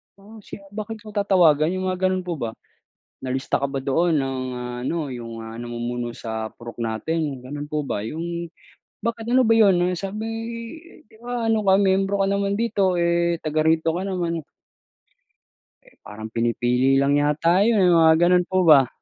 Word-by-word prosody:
Um, 210 +3 -15
siya 200 0 -11
bakit 215 +1 -6
ko 215 - -10
tatawagan?" 180 -6 +3
Yung 185 0 -2
mga 185 0 0
ganun 185 0 0
po 175 -3 -4
ba. 115 -1 -3 0.7
"Nalista 130 +1 -1
ka 140 - 0
ba 135 - -3
doon 155 +5 +1
ng 135 -1 -2 0.4
ano, 160 +2 -2
yung, 115 -2 -7
ah, 115 - -8
namumuno 120 0 -4
sa 110 -1 -5
purok 120 0 -9
natin," 140 +6 -2
gano'n 145 +2 -6
po 150 -1 -1
ba. 100 - -2
Yung 170 +6 -5 0.6
bakit 230 0 -3
ano 255 +1 +4
ba 225 - +4
yun 185 -5 +4
sabi 200 +3 -5 0.8
'di 220 +1 -22
ba 240 -1 -3
ano 225 -1 +2
ka 195 -2 +4
miyembro 195 0 +2
ka - - +1
naman 200 0 0
dito, 200 -5 +1
eh, 170 0 +1
taga 155 0 0
rito 160 +1 +2
ka 175 - -3
naman. 170 -4 -2 1.4
Eh, - - -23
parang 110 +1 -8
pinipili 120 +3 +1
lang 140 +1 +3
yata 155 +5 +2
yun, 200 -6 +4
mga 165 -1 +6
ganun 180 0 +4
po 185 0 +1
ba. 145 -6 +7
170 Hz, 170 wpm, -23 LUFS, 135-195 Hz, 1.4 s, ba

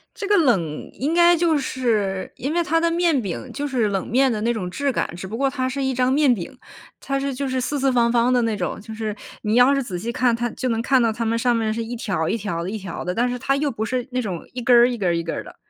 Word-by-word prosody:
这 405 - -5
个 415 - +4
冷 195 - +1
应 290 +5 -2
该 345 0 +6
就 325 -2 +2
是 220 -8 -1
因 280 +5 -3
为 345 - +2
它 330 0 +1
的 335 0 +1
面 335 -5 +2
饼 200 +5 -5
就 290 +1 -3
是 245 -6 +1
冷 195 -2 -2
面 265 +3 +3
的 215 - -2
那 235 +2 +1
种 185 -5 -4
质 280 +9 -1
感， 245 - -2
只 180 - -7
不 215 +4 -5
过 275 0 +2
它 260 -1 -2
是 275 +2 -3
一 265 0 0
张 250 +1 +1
面 280 -2 +4
饼， 225 +5 -6 0.4
它 275 0 -2
是 275 0 -2
就 275 +2 -3
是 260 0 -1
四 280 +3 -2
四 270 0 +2
方 235 -2 +3
方 240 +1 +3
的 250 - +3
那 225 -2 0
种， - - -3
就 220 +1 -9
是 215 -1 -4 0.3
你 215 +1 +1
要 250 +3 +6
是 275 - +1
仔 195 -8 -5
细 225 +7 -4
看， 245 -1 +2
它 240 +1 -2
就 255 +3 -4
能 230 -1 0
看 260 +1 +3
到 230 -1 +2
它 230 +1 -3
们 230 +1 0
上 245 0 +2
面 220 -1 0
是 230 - -3
一 235 +2 -5
条 190 -9 -2
一 - - 0
条 185 -5 -3
的 175 - -4
一 215 - -3
条 190 -4 -6
的， 180 +1 -2
但 245 +2 +1
是 250 - -3
它 275 +2 +1
又 285 0 0
不 220 -2 -3
是 250 +1 -2
那 250 0 0
种 185 -7 -5
一 250 - -4
根 245 +1 +4
儿 240 +1 +7
一 245 - -3
根 195 -4 -1
儿 170 - +2
一 170 - -1
根 165 - -3
儿 - - -4
的。 - - -13
245 Hz, 330 characters per minute, -22 LUFS, 215-270 Hz, 0.4 s, 儿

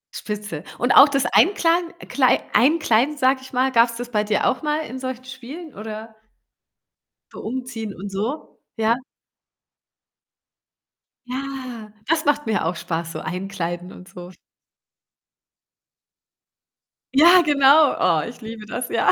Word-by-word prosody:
Spitze. 205 -7 -6
Und 245 +1 0
auch 285 - +8
das 275 -1 0
Einkladen 345 -2 +2 0.2
Klei 260 -3 +2
Einkleiden, 290 -1 +3
sage 260 0 +2
ich 265 - -13
mal, 260 +1 +1
gab's 235 -1 +3
das 245 0 -7
bei 210 -2 +1
dir 210 -1 0
auch 255 - 0
mal 300 0 -1
in 260 +3 -7
solchen 255 -1 -6
Spielen, 265 +5 -10
oder? 220 +1 -8 1.2
So - - -9
umziehen 230 -3 -5
und 200 +3 -7
so, 220 +10 -5 0.2
ja? 225 +1 +2 2.3
Ja, 255 -4 -6 0.2
das 325 +1 +1
macht 290 0 +1
mir 215 -6 0
auch 175 - -1
Spaß. 165 0 -4
So, - - -5
Einkleiden 180 -1 -5
und 180 - -13
so. 180 0 -11 2.8
Ja, 345 +5 +7
genau. 290 +1 +5
Oh, 160 -4 +2
ich 240 - -11
liebe 220 -1 -8
das, 240 +3 -5
ja. - - +3
245 Hz, 130 wpm, -22 LUFS, 210-275 Hz, 2.8 s, auch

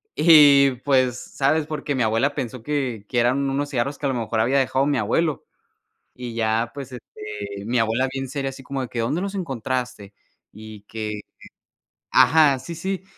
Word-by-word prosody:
Y 145 -4 +7
pues, 130 -3 +2
¿sabes? 150 +2 0
Porque 150 -2 -3
mi 130 - -1
abuela 115 +6 +1
pensó 125 -1 -5
que 130 -8 -3
que 120 - 0
eran 130 +4 +1
unos 145 +1 -2
cigarros 140 +1 -2
que - - -4
a - - 0
lo 130 - -1
mejor 115 -1 -2
había 125 +5 +2
dejado 135 0 +1
mi 145 - +1
abuelo. 145 +8 0 0.7
Y 120 -2 -6
ya 115 0 0
pues, 135 -2 -8
este 105 -4 -8
mi 120 +2 0
abuela 115 +4 +1
bien 135 0 -4
seria 135 0 -3
así 135 - -11
como 135 +1 -4
de 130 - -4
que: 120 - -5
"¿Dónde 120 +10 -1
los 200 0 -4
encontraste?". 125 - -4 0.4
Y 110 0 -11
que 105 -1 -5 0.9
ajá, 150 -4 +5
sí, 170 - -8
sí. 190 +3 -4
130 Hz, 180 wpm, -23 LUFS, 115-145 Hz, 0.9 s, Y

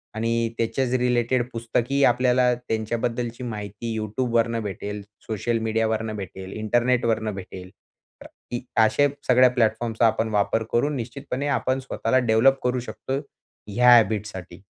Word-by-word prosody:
आणि 115 +1 0
त्याच्याच 120 +3 -1
रिलेटेड 125 0 +1
पुस्तकी 120 +4 0
आपल्याला 125 0 +3
त्यांच्याबद्दलची 120 +1 -3
माहिती 105 0 -5
Youtubeवरनं 115 +1 0
भेटेल, 105 0 -5 0.3
सोशल 115 +2 -1
मीडियावरून 110 0 0
भेटेल, 95 -1 -7
इंटरनेटवरनं 115 -1 +1
भेटेल. 90 -1 -9 0.8
की 120 - -2 0.2
अ 110 - +7
अशा 125 +7 +3 0.2
सगळ्या 125 0 +6
प्लॅटफॉर्मचा 115 -1 +1
आपण 110 0 0
वापर 105 +1 +1
करून 145 +5 +1
निश्चितपणे 135 +3 -4
आपण 130 +1 -1
स्वतःला 130 -1 0
डेव्हलप 125 +3 +3
करू 125 0 +1
शकतो 120 +3 -4 0.5
ह्या 125 +4 +4
हॅबिटसाठी. 105 -5 0
115 Hz, 120 wpm, -24 LUFS, 110-125 Hz, 0.8 s, अ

